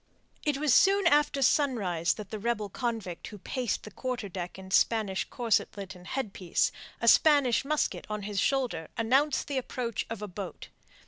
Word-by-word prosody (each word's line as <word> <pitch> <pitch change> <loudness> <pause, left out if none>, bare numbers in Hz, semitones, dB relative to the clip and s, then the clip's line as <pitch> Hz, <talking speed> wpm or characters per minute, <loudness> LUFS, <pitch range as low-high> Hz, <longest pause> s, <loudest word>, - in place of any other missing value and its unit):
It 295 -2 +1
was 295 -3 +2
soon 395 +4 +5
after 295 -3 +3
sunrise 205 - +2
that 210 -3 -9
the 215 - -4
rebel 215 -2 -1
convict 225 -6 -4
who 210 - -9
paced 245 +3 -3
the 215 - -9
quarter 250 0 -4
deck 180 -1 -6
in 190 0 -10
Spanish 205 -2 +2
corselet 205 -4 -1
and 180 -1 -14
headpiece, 200 -9 -1 0.3
a 235 - -2
Spanish 280 -2 +5
musket 300 +2 -1
on 210 -1 -3
his 205 -1 -2
shoulder, 245 - 0
announced 265 +6 +2
the 280 -2 0
approach 245 -2 -4
of 225 -2 -5
a - - -3
boat. 190 -1 -7
225 Hz, 170 wpm, -29 LUFS, 195-270 Hz, 0.3 s, soon